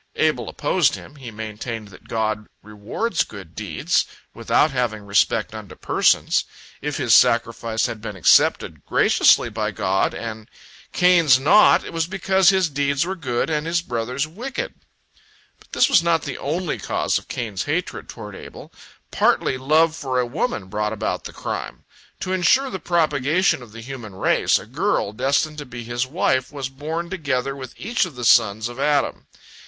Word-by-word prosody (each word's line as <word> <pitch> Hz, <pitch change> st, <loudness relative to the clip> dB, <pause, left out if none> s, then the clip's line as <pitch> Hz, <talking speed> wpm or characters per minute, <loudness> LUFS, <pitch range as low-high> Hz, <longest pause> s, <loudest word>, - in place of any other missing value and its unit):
Abel -, -, 0 dB
opposed -, -, +1 dB
him; 145 Hz, -, -12 dB
he 130 Hz, -4 st, -8 dB
maintained 110 Hz, 0 st, -6 dB
that 90 Hz, -, -16 dB
God 110 Hz, -2 st, -2 dB, 0.2 s
rewards 110 Hz, -, -2 dB
good 95 Hz, -6 st, -11 dB
deeds, 100 Hz, -8 st, -1 dB, 0.3 s
without 155 Hz, -, +2 dB
having 120 Hz, -5 st, -2 dB
respect 100 Hz, 0 st, +1 dB
unto -, -, -9 dB
persons. -, -, +2 dB, 0.4 s
If 150 Hz, 0 st, -3 dB
his 120 Hz, -6 st, +2 dB
sacrifice 115 Hz, -1 st, +3 dB
had 115 Hz, -3 st, -5 dB
been 105 Hz, -2 st, -6 dB
accepted 90 Hz, -, +3 dB
graciously -, -, +4 dB
by 105 Hz, 0 st, -2 dB
God, 95 Hz, -1 st, 0 dB
and 110 Hz, -1 st, -7 dB, 0.4 s
Cain's 170 Hz, -7 st, +5 dB
not, 160 Hz, +10 st, +5 dB
it -, -, -8 dB
was 165 Hz, -1 st, -1 dB
because 190 Hz, 0 st, +3 dB
his 190 Hz, -2 st, +3 dB
deeds 140 Hz, +1 st, 0 dB
were 190 Hz, +2 st, -3 dB
good, 125 Hz, -9 st, -2 dB
and 150 Hz, +1 st, -1 dB
his 170 Hz, 0 st, 0 dB
brother's 125 Hz, +2 st, -2 dB
wicked. 240 Hz, +12 st, -5 dB, 0.9 s
But -, -, -23 dB
this -, -, +4 dB
was -, -, +5 dB
not 170 Hz, -2 st, +1 dB
the 145 Hz, -, -5 dB
only 165 Hz, +4 st, -2 dB
cause -, -, 0 dB
of -, -, -20 dB
Cain's 110 Hz, -6 st, -4 dB
hatred 165 Hz, +5 st, -3 dB
toward 105 Hz, -3 st, -9 dB
Abel. -, -, -11 dB, 0.4 s
Partly -, -, +2 dB
love 155 Hz, +5 st, +2 dB
for 130 Hz, -4 st, -2 dB
a 125 Hz, -, +1 dB
woman 120 Hz, -, -2 dB
brought 105 Hz, +2 st, -2 dB
about 110 Hz, -, -3 dB
the -, -, -6 dB
crime. -, -, -6 dB, 0.4 s
To 185 Hz, -, -2 dB
ensure 220 Hz, +10 st, +3 dB
the 190 Hz, -, -4 dB
propagation 160 Hz, -1 st, +1 dB
of 120 Hz, -3 st, -13 dB
the 115 Hz, +1 st, -10 dB
human 115 Hz, -5 st, -8 dB
race, -, -, +2 dB
a -, -, -8 dB
girl, 100 Hz, -, -1 dB
destined 140 Hz, +6 st, 0 dB
to 145 Hz, -, -6 dB
be 120 Hz, -1 st, -8 dB
his 120 Hz, +2 st, -2 dB
wife, 130 Hz, -4 st, 0 dB
was 140 Hz, -3 st, -5 dB
born 160 Hz, +6 st, -5 dB
together 135 Hz, -6 st, -2 dB
with 130 Hz, -2 st, -9 dB
each 225 Hz, 0 st, 0 dB
of 170 Hz, -6 st, -10 dB
the 125 Hz, -1 st, -5 dB
sons 110 Hz, -1 st, +4 dB
of 120 Hz, +2 st, -9 dB
Adam. 145 Hz, 0 st, 0 dB
130 Hz, 170 wpm, -22 LUFS, 110-160 Hz, 0.9 s, Cain's